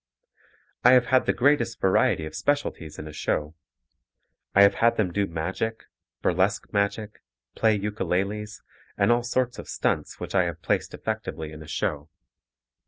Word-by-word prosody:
I 125 - +7
have 125 -1 +6
had 130 - +4
the - - +5
greatest 140 -2 +2
variety 95 -4 +2
of 80 - -8
specialties 115 - -2
in 75 - -7
a 75 - -9
show. 75 +1 -2 1.0
I 100 - +8
have 100 - +6
had 115 0 +4
them 95 -5 +1
do 100 +1 +1
magic, 95 +7 -3 0.4
burlesque - - +1
magic, 105 +1 -1 0.3
play 110 -2 +2
ukuleles, 105 +1 -2 0.3
and - - +3
all 120 +1 +3
sorts 125 0 -1
of - - -9
stunts - - -1
which - - -6
I 95 -2 +3
have 85 -1 -5
placed - - -1
effectively 80 -1 -4
in 75 0 -10
a 80 - -11
show. 75 -1 -2
100 Hz, 160 wpm, -26 LUFS, 80-115 Hz, 1.0 s, I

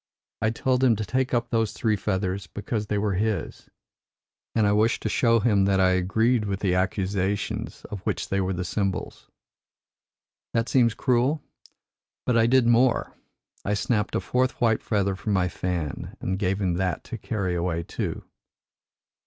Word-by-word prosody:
I 110 - +2
told 125 +3 0
him 120 -3 +5
to 110 0 -3
take 130 +6 0
up 120 -1 0
those 115 -2 +1
three 110 -2 +1
feathers 95 -1 -2
because 105 +4 -4
they 105 - 0
were 100 -1 0
his, 100 -2 -2 0.9
and 110 -2 +3
I 100 - +3
wished 110 +3 +2
to - - 0
show 115 -2 +3
him 105 -4 +3
that 95 -1 +2
I 95 -1 +5
agreed 105 +6 +2
with 100 -1 -3
the 95 -3 +2
accusations 95 +1 -1
of 105 - -6
which - - -3
they 100 0 +1
were 95 0 -1
the 90 0 -2
symbols. 100 -2 -3 1.3
That 115 +1 +1
seems 120 -4 +3
cruel? 130 +4 +1 0.8
But 125 - +2
I 115 0 +4
did 130 0 +4
more. 120 +1 +3 0.5
I 105 - 0
snapped 105 0 0
a - - +2
fourth 130 +1 0
white 115 -3 +2
feather 100 -3 0
from 105 +2 -2
my 90 -2 +2
fan 85 -3 -4
and 95 +1 -2
gave 95 0 0
him 90 -3 +1
that 90 -3 -1
to - - -7
carry 95 -4 -2
away 85 -1 -1
too. - - -4
105 Hz, 170 wpm, -25 LUFS, 95-115 Hz, 1.3 s, him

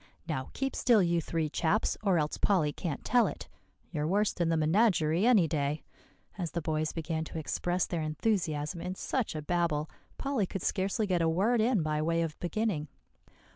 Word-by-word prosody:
Now, 130 -5 -3
keep 270 0 -2
still, 230 -6 +4
you 170 -1 +2
three 165 0 -1
chaps, 170 +7 +1
or 195 -4 +2
else 150 -1 -1
Polly 160 -8 +2
can't 160 -4 -4
tell 245 -2 +4
it. - - -6 0.4
You're 150 -3 -1
worse 205 +4 +2
than 170 -2 0
the 165 - +2
menagerie 170 +1 +3
any 210 -9 +5
day," 150 -1 -1 0.6
as 170 -4 -3
the - - 0
boys 155 0 -1
began 160 -1 -3
to 160 - -7
express 175 +3 -1
their 170 -2 -3
enthusiasm 155 -1 -1
in 185 +1 -4
such 240 -2 -2
a 155 - -4
babel, 165 -2 0 0.3
Polly 270 -8 0
could 195 - -5
scarcely 195 +2 0
get 180 -4 +1
a 165 - +3
word 215 +8 +2
in 220 -6 +2
by 155 0 0
way 165 +1 +1
of 155 -2 -5
beginning. 175 -4 -1
170 Hz, 185 wpm, -30 LUFS, 155-200 Hz, 0.6 s, any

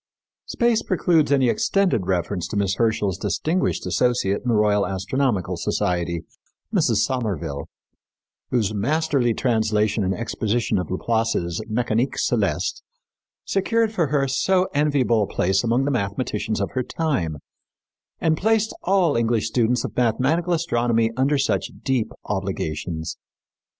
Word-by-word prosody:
Space 235 -2 +2
precludes 165 -5 +2
any 135 -3 +4
extended 180 - +1
reference 90 -1 -1
to 105 - -4
Miss 100 -1 +1
Herschel's 105 -4 0
distinguished 175 - -1
associate 120 -6 +1
in - - -8
the 120 - +3
Royal 105 -1 +3
Astronomical 95 -1 -1
Society, 85 -3 -1 0.5
Mrs. - - +3
Somerville, 95 - -3 0.8
whose 110 -4 0
masterly 135 +1 +1
translation 110 -3 +1
and 95 0 0
exposition 110 0 -1
of 90 - -4
Laplace's 110 -3 -1
Mécanique 120 +2 0
Céleste - - 0 0.6
secured 225 +3 +1
for 170 -7 +1
her 140 -1 +1
so 185 +7 +2
enviable 140 -6 +2
a 100 - 0
place 95 +2 +1
among 120 +3 +1
the 145 - 0
mathematicians 110 -1 -2
of 100 - -2
her 130 - -1
time, 125 - -2 0.8
and 160 -1 +2
placed 220 +4 +1
all 185 -5 +2
English 115 -1 +1
students 120 +1 +1
of - - -5
mathematical 135 +9 +1
astronomy 120 -8 +1
under 135 +3 +2
such 135 - 0
deep 130 -5 0
obligations. 85 -5 -3
115 Hz, 130 wpm, -23 LUFS, 100-140 Hz, 0.8 s, any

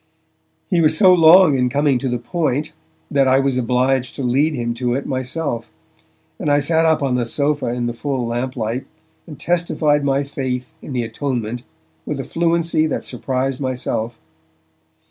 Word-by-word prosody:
He 175 -4 +2
was 155 0 +3
so 185 -1 +7
long 170 -2 +7
in 125 -1 +1
coming 140 0 +1
to 130 - -2
the 125 - -1
point, 150 +2 -2 0.4
that 135 -1 +3
I 130 0 +4
was 135 -1 +1
obliged 125 +1 0
to 140 - -4
lead 140 +5 +1
him 120 -2 -2
to 120 0 -1
it 135 - -3
myself, 130 -2 -3 0.7
and - - -1
I 145 - +4
sat 160 +3 +2
up 160 -2 +2
on 135 -2 0
the 125 -1 +1
sofa 145 +5 -1
in 120 0 -2
the 120 - -2
full 130 0 -3
lamplight, 120 0 -3 0.4
and 150 -5 -10
testified 160 -4 +1
my 140 0 +1
faith 130 -1 -4
in 140 - -8
the 125 -2 -1
atonement 120 -1 -3 0.4
with 145 - -4
a - - -2
fluency 165 +1 +1
that - - -3
surprised 130 0 -3
myself. 125 -3 -3
135 Hz, 170 wpm, -19 LUFS, 125-150 Hz, 0.7 s, so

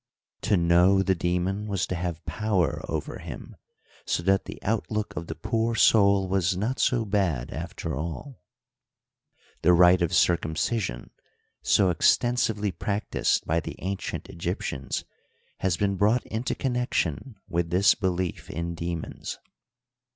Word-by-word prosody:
To 100 - +2
know 90 +3 +4
the 95 - +2
demon 90 +4 -1
was 100 -2 -1
to - - -4
have 85 -2 -4
power 100 - 0
over - - -4
him, - - -9 0.5
so 85 - -1
that 95 +2 +2
the - - -7
outlook 105 0 -2
of 85 - -5
the - - -5
poor 115 +1 -1
soul 100 -3 +4
was 95 -1 +1
not 115 +7 -2
so 120 -3 +2
bad, 95 - 0
after 80 -1 -5
all. 85 - -6 1.2
The 90 - +5
rite 90 +1 +6
of 85 -1 +1
circumcision, 80 - 0 0.5
so 95 -3 +3
exten 120 +8 +3
sively 105 -3 0
practiced 105 +3 -1
by 80 +1 +1
the 80 - -6
ancient 95 +1 -4
Egyptians, 85 -6 -4 0.5
has 95 -3 0
been 100 0 0
brought 110 +5 +2
into 110 +3 -3
connection 125 - -1
with 85 -2 -1
this 95 +3 +5
belief 95 -3 -2
in 85 +2 -3
.demons. 85 -1 -5
95 Hz, 135 wpm, -26 LUFS, 85-105 Hz, 1.2 s, rite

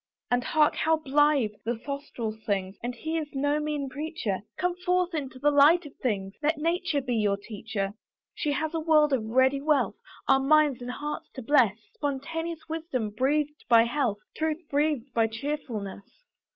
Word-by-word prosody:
And 245 0 +2
hark! 300 +2 +3
how 320 0 +3
blithe 290 -6 +2
the 235 +1 -1
throstle 275 -3 -4
sings! 200 -3 -3
And 245 +1 -4
he 320 +6 -2
is 305 - -4
no 290 +2 +1
mean 300 -2 -2
preacher; 285 - -3 0.2
Come 360 -1 0
forth 360 -1 +1
into 275 -4 -4
the 295 +3 +3
light 300 +4 +6
of 290 - -11
things, 195 -5 -2
Let 310 +1 +1
Nature 335 -1 0
be 250 -2 -2
your 205 -2 +2
teacher. 205 -1 -4 0.4
She 295 -2 -1
has 315 +3 -2
a 325 - 0
world 305 -2 +4
of 250 -5 +1
ready 260 +5 +3
wealth, 295 0 +2 0.3
Our 270 - +5
minds 285 -2 +4
and 245 - -5
hearts 295 +4 -5
to 260 - -6
bless 235 -6 +4 0.2
Spontaneous 320 +3 -4
wisdom 315 -9 -3
breathed 295 +6 0
by 230 -1 +7
health, 235 -3 0 0.2
Truth 315 +2 -1
breathed 285 -3 0
by 225 -1 +3
chearfulness. 230 - -5
280 Hz, 170 wpm, -27 LUFS, 235-305 Hz, 0.4 s, by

